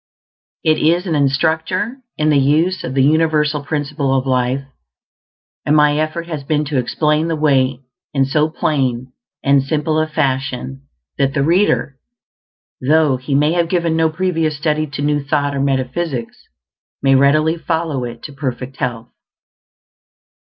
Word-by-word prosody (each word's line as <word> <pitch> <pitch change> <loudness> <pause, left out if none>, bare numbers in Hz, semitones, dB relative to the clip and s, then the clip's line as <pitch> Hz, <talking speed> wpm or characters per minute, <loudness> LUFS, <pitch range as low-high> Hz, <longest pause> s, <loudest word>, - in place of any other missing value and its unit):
It 155 -1 +2
is 170 +4 +2
an 170 - -1
instructor 160 - 0 0.2
in 155 0 +2
the 145 - +4
use 160 +7 +1
of 130 - -5
the 135 - +3
universal 150 0 +2
Principle 145 -2 -1
of 130 - -1
Life, 130 +1 0 1.0
and 150 - +2
my 150 0 +4
effort 155 +2 -2
has 155 -4 -5
been 150 +1 0
to 140 -2 -1
explain 150 +5 0
the 165 - -1
way 135 -4 +1 0.3
in 135 -2 +2
so 150 +3 +1
plain 130 -5 -1 0.3
and 140 0 +4
simple 155 +2 -1
a 155 - +1
fashion 135 -2 -2 0.3
that 135 +1 +1
the 140 - +2
reader, 165 -5 +1 0.8
though 150 0 +3
he 135 +2 -3
may 150 +2 +3
have 170 -1 +1
given 170 -3 0
no 160 0 +2
previous 165 -2 -1
study 155 0 0
to 145 0 -5
New 145 -1 0
Thought 145 0 0
or - - -2
metaphysics, 135 -1 -2 0.6
may 135 -1 +4
readily 155 +4 +3
follow 160 -5 -2
it 120 -1 -7
to 145 - -8
perfect 135 -1 -5
health. 120 -2 -4
150 Hz, 150 wpm, -18 LUFS, 135-160 Hz, 1.0 s, the